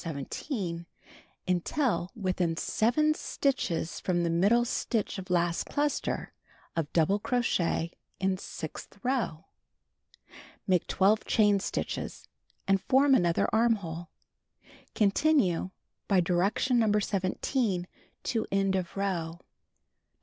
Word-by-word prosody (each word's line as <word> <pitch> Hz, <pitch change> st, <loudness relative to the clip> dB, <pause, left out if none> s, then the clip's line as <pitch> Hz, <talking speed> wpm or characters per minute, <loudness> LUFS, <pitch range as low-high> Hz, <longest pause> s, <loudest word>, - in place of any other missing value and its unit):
17, 170 Hz, -, -4 dB, 0.6 s
until 185 Hz, -, 0 dB
within 185 Hz, -5 st, -1 dB
7 305 Hz, -, +2 dB
stitches 195 Hz, -, -1 dB
from 170 Hz, -2 st, 0 dB
middle 235 Hz, +6 st, +4 dB
stitch 225 Hz, -4 st, -1 dB
of 190 Hz, 0 st, -9 dB
last 175 Hz, -1 st, +1 dB
cluster 290 Hz, 0 st, -1 dB, 0.4 s
of 160 Hz, -3 st, -2 dB
double 175 Hz, +5 st, +2 dB
crochet 190 Hz, -8 st, 0 dB, 0.3 s
in 190 Hz, 0 st, +1 dB
sixth 160 Hz, 0 st, -8 dB
row. 245 Hz, -11 st, -1 dB, 1.2 s
Make 185 Hz, -3 st, +2 dB
12 205 Hz, +3 st, +3 dB
chain 210 Hz, -3 st, +4 dB
stitches -, -, -4 dB, 0.4 s
and 195 Hz, -1 st, +3 dB
form 270 Hz, +1 st, +4 dB
other 170 Hz, -1 st, +2 dB
armhole. 200 Hz, -7 st, +1 dB, 0.9 s
Continue 205 Hz, -, +2 dB, 0.4 s
by 195 Hz, -2 st, +4 dB
direction 190 Hz, +8 st, +2 dB
No. 215 Hz, -2 st, +3 dB
17 195 Hz, 0 st, 0 dB, 0.4 s
to 225 Hz, -2 st, -1 dB
end 195 Hz, -1 st, +2 dB
of 185 Hz, 0 st, -3 dB
row. 180 Hz, -5 st, -1 dB
21. -, -, -29 dB
195 Hz, 105 wpm, -29 LUFS, 175-230 Hz, 1.2 s, middle